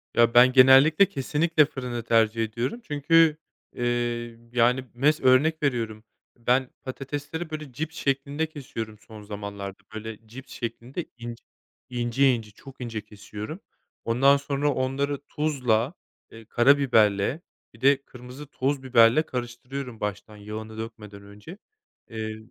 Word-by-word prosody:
Ya 115 0 +4
ben 125 +1 +7
genellikle 135 +7 +7
kesinlikle 150 +3 +2
fırını 125 -4 -5
tercih 115 0 +2
ediyorum 120 - -3
çünkü, 155 +1 +3 0.4
ııı, 120 -1 -2 0.2
yani 125 +2 +3
mes 145 +6 +2
örnek 145 +5 +3
veriyorum 115 -6 -1 0.3
ben 125 +2 +1
patatesleri 145 +5 -5
böyle 155 -3 -6
cips 160 +5 -5
şeklinde 140 +1 -1
kesiyorum 120 -8 -7
son 110 +1 -13
zamanlarda 100 -1 -7
böyle 110 0 -8
cips 130 +5 -11
şeklinde 120 +7 -5
ince 120 -1 -8 0.5
İnce 125 +2 +2
ince 110 -3 -5
çok 135 +5 -14
ince 115 -3 -4
kesiyorum. 105 - -9 0.5
Ondan 135 +5 +4
sonra 140 +1 -1
onları 135 +2 -1
tuzla, 130 -4 0 0.4
eee, 115 0 -13
karabiberle 120 -1 +3 0.3
bir 115 - -19
de 140 +1 +4
kırmızı 125 +3 -11
toz 135 0 -2
biberle 120 +1 +5
karıştırıyorum 125 -1 -6
baştan 105 +1 -5
yağını 110 +1 -8
dökmeden 110 -3 -8
önce. 105 - -12 0.5
Eee, 110 -1 -5
125 Hz, 125 wpm, -25 LUFS, 115-140 Hz, 0.5 s, ben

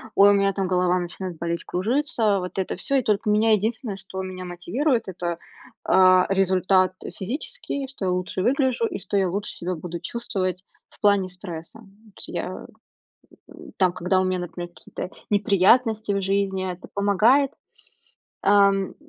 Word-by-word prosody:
ой, 200 +1 +7
у - - +5
меня, 195 0 +2
там, 195 -1 -1
голова 180 0 +2
начинает 175 0 -6
болеть, 170 0 -3
кружиться. 220 0 +1
Вот 180 +1 -6
это 190 - -2
всё, 275 - -1
и 270 - +4
только 210 0 0
меня 215 +2 +3
единственное, 215 0 0
что 190 0 -7
меня 185 -1 -6
мотивирует 220 - -1
это, 175 -2 -3 0.5
а, 185 -1 +5
результат 185 -1 +3 0.3
физический, 275 - -4
что 265 -7 -6
я 185 - +1
лучше 180 +1 -2
выгляжу, 255 +1 +1
и - - -5
что 200 +1 -2
я 190 -2 +2
лучше 200 +3 -3
себя 180 +1 -4
буду 170 +1 -6
чувствовать 185 -3 -3 0.2
в - - -20
плане 200 -2 +3
стресса. 180 +1 -9
Вот 210 0 -20
я, - - -5 0.8
м, - - -13
там 185 -2 +3
когда 180 +1 +1
у - - +1
меня, 185 -1 0
например, 175 0 -6
какие-то 175 - -8 0.2
неприятности 210 +2 +3
в 200 - 0
жизни, 195 -1 0
это 180 0 -10
помогает, 220 +8 +3 0.9
а, 200 0 +6
м, 195 -1 -2
195 Hz, 165 wpm, -24 LUFS, 185-215 Hz, 0.9 s, ой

